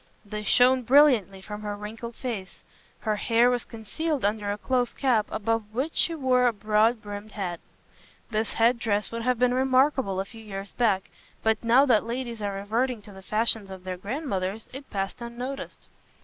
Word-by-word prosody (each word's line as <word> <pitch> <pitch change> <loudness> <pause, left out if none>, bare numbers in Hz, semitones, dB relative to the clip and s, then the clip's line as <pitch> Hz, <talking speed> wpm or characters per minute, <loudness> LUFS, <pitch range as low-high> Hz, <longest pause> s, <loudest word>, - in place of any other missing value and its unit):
They 210 +1 -5
shone 250 +4 +4
brilliantly 245 - +4
from 210 +2 -7
her 210 -1 -3
wrinkled 225 +3 -7
face. 215 -7 -5 0.4
Her 215 -1 0
hair 235 +3 +3
was 245 -1 -1
concealed 275 +5 -3
under 205 0 0
a 205 - -3
close 250 +2 0
cap, 240 -6 +2
above 220 0 -2
which 280 +6 -1
she 335 - +2
wore 255 -4 +3
a 240 - +2
broad 215 +2 +2
brimmed 205 +1 -7
hat. 180 -5 -3 0.7
This 220 0 -1
head 235 +1 +3
dress 210 -3 0
would 230 0 -4
have 250 +1 +1
been 250 +1 +3
remarkable 260 -5 +2
a 195 - -1
few 225 +2 -12
years 195 -1 -7
back, 200 -6 +1 0.3
but 220 0 +1
now 245 +4 +5
that 235 -6 +4
ladies 235 -1 -4
are 200 -1 -2
reverting 225 +3 -1
to 210 - -12
the 190 -1 -12
fashions 215 0 0
of 190 -1 -9
their 185 0 -4
grandmothers, 200 - -3
it 270 +1 -8
passed 195 +3 -3
unnoticed. 245 +3 -6
225 Hz, 180 wpm, -26 LUFS, 205-250 Hz, 0.7 s, now